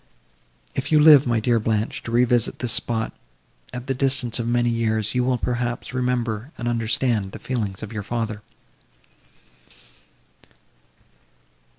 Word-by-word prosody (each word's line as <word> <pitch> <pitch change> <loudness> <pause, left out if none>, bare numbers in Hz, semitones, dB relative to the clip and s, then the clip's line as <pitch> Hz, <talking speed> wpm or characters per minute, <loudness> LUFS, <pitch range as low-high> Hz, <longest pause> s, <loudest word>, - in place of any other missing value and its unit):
If - - -3
you 155 - +6
live, 150 -3 +8
my 120 -2 +2
dear 115 +1 +2
Blanche, 110 0 -1
to 115 - -7
revisit 120 0 +2
this 125 -2 -2
spot, 115 -1 -1 0.6
at 125 0 -6
the 135 - -1
distance 130 -3 0
of 115 - -2
many 120 0 +2
years, 110 -2 0
you 125 -1 +1
will, 125 0 +1
perhaps, 120 +1 -3
remember 125 -1 -1
and 120 - -4
understand 115 -3 0
the - - -6
feelings 110 -7 -4
of 110 +1 -7
your 105 - -3
father." 110 0 -3
120 Hz, 135 wpm, -23 LUFS, 110-125 Hz, 0.6 s, live